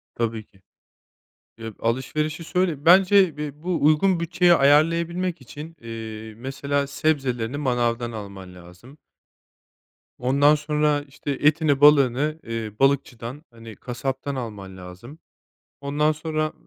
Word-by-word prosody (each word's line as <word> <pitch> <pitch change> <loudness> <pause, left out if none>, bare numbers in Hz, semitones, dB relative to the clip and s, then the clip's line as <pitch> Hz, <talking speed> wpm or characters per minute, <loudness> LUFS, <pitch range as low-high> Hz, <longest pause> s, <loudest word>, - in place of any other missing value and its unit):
Tabii 115 -1 -2
ki. 95 -2 -27 1.0
Ya, 115 -1 -7
alışverişi 150 +7 -2
söyle 170 -4 -1
bence 185 -1 +5
bi 150 0 -7
bu 175 -3 -1
uygun 165 +4 +3
bütçeye 175 +1 +3
ayarlayabilmek 165 +4 +2
için, 150 +6 -10
eee, 110 -1 -8
mesela 140 +3 -2
sebzelerini 135 -4 -1
manavdan 120 -4 -1
alman 100 -4 -9
lazım. 90 - -15 1.2
Ondan 140 +4 +3
sonra, 150 -1 0
işte, 145 0 -7
etini, 145 0 +2
balığını, 145 +1 +4
eee, 115 -2 -5
balıkçıdan, 135 -1 -1
hani, 115 -2 -12
kasaptan 135 +4 -5
alman 105 -7 -7
lazım. 90 - -12 0.6
Ondan 145 +2 +1
sonra 155 0 -3
140 Hz, 110 wpm, -23 LUFS, 115-155 Hz, 1.2 s, bence